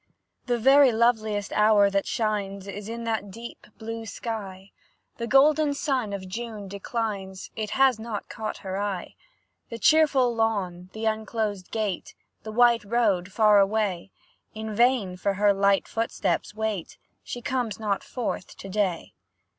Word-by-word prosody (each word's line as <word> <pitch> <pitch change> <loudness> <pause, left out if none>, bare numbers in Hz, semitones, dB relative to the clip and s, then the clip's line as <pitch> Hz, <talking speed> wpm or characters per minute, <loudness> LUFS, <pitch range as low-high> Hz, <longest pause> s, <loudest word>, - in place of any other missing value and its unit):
The 245 -1 +1
very 270 +3 +6
loveliest 220 -3 +1
hour 210 -1 +5
that 195 0 0
shines, 200 -3 -2
Is 200 +2 -7
in 230 0 -5
that 220 -3 -2
deep 230 +5 -10
blue 225 0 -6
sky; 200 -4 -6 0.5
The 235 - -3
golden 290 +3 +4
sun 265 -7 -1
of 195 -2 -5
June 215 0 -6
declines, 200 -2 -4
It 215 -1 -3
has 265 -4 +4
not 220 -2 -5
caught 215 -1 -5
her 190 +1 -3
eye. 195 -4 -3 0.6
The 230 - -5
cheerful 275 -2 +4
lawn, 195 -6 -1
and 220 +1 -4
unclosed 215 -3 -2
gate, 210 -5 -3 0.3
The 215 - -7
white 235 0 +4
road, 205 -4 +1
far 210 0 +5
away, 195 -3 0 0.5
In 220 0 -5
vain 230 -5 +2
for 195 +2 -1
her 205 +1 +4
light 200 0 +2
footsteps 225 -1 -2
wait, 215 -5 -3 0.3
She 245 - -7
comes 245 -5 -2
not 205 -3 -1
forth 240 -6 -5
to 195 - -9
day. 190 -4 -1
215 Hz, 145 wpm, -26 LUFS, 200-235 Hz, 0.6 s, very